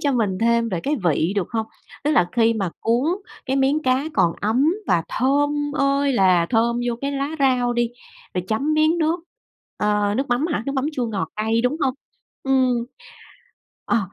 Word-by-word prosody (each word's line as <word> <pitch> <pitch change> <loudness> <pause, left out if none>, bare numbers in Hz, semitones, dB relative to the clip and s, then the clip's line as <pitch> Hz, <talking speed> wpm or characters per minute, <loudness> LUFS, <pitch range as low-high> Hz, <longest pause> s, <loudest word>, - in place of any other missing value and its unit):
cho 285 -2 +1
mình 210 -6 0
thêm 235 0 +2
về 180 -5 -2
cái 295 - -1
vị, 165 +2 +2
được 190 - 0
hông? 220 -1 -2 0.4
Tức 300 - +2
là 175 - +3
khi 230 0 +4
mà 195 -5 -2
cuốn 235 +4 +1 0.4
cái 265 +1 0
miếng 275 +3 +2
cá 260 +1 +1
còn 170 - +3
ấm 245 +9 +2 0.2
và 170 -2 +3
thơm 290 +2 0
ơi 275 0 +2
là 185 -6 +3
thơm 235 0 +2
vô 240 - 0
cái 280 +1 -2
lá 275 +1 -2
rau 250 -3 +2
đi, 240 -1 0 0.4
rồi 180 - -2
chấm 275 +8 0
miếng 310 +2 +3
nước, 325 +2 +1 0.6
ờ, 210 -1 +1
nước 270 0 -1
mắm 245 +6 +1
hả, 295 -10 -2
nước 275 - -1
mắm 265 0 -1
chua 250 -4 -2
ngọt 205 -4 -3
cay, 220 +2 +1
đúng 255 +5 +1
hông? 260 -2 +1 0.5
Ừm. 255 -3 +2 1.0
Ờ, 240 - +2
245 Hz, 190 wpm, -22 LUFS, 220-280 Hz, 1.0 s, khi